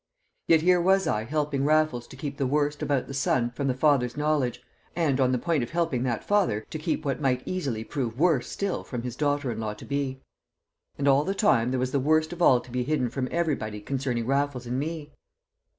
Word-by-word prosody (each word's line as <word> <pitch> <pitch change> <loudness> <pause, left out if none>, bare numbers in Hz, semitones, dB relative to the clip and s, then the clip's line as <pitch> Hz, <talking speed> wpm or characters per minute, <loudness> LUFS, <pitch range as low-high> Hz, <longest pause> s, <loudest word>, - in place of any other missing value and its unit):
Yet 160 -1 +5
here 180 0 +4
was 190 +2 +3
I 105 +1 0
helping 145 0 -1
Raffles 155 -5 +2
to - - -12
keep 140 +1 -5
the 135 - 0
worst 145 +2 0
about 140 -3 0
the - - -8
son 125 -3 +1
from 135 +3 -3
the 130 - +1
father's 130 -3 +2
knowledge, 150 -4 0 0.4
and 150 -6 +1
on 130 -1 +3
the 130 - +2
point 165 +1 0
of 120 - -3
helping 165 -7 0
that 120 -3 -1
father 120 - +1
to 155 - -4
keep 155 0 -2
what 140 +1 -1
might 130 -2 +1
easily 135 -12 -2
prove 120 -2 -4
worse 155 -5 +2
still 200 -1 -2
from 120 -2 -5
his 125 -1 -5
daughter 145 -2 0
in 110 - -5
law 105 -1 -3
to - - -11
be. 140 -2 -2 0.8
And 140 - -1
all 140 +1 +5
the 195 +5 -2
time 135 - +3
there 130 0 -1
was 130 0 -1
the 140 - +1
worst 155 +4 +2
of 175 - -8
all 130 -7 +6
to 125 - -14
be 125 +1 -1
hidden 130 -3 0
from 130 -1 -2
everybody 140 -11 -1
concerning 125 0 -2
Raffles 135 -1 0
and 125 +2 -2
me! 155 0 -4
140 Hz, 225 wpm, -26 LUFS, 125-155 Hz, 0.8 s, all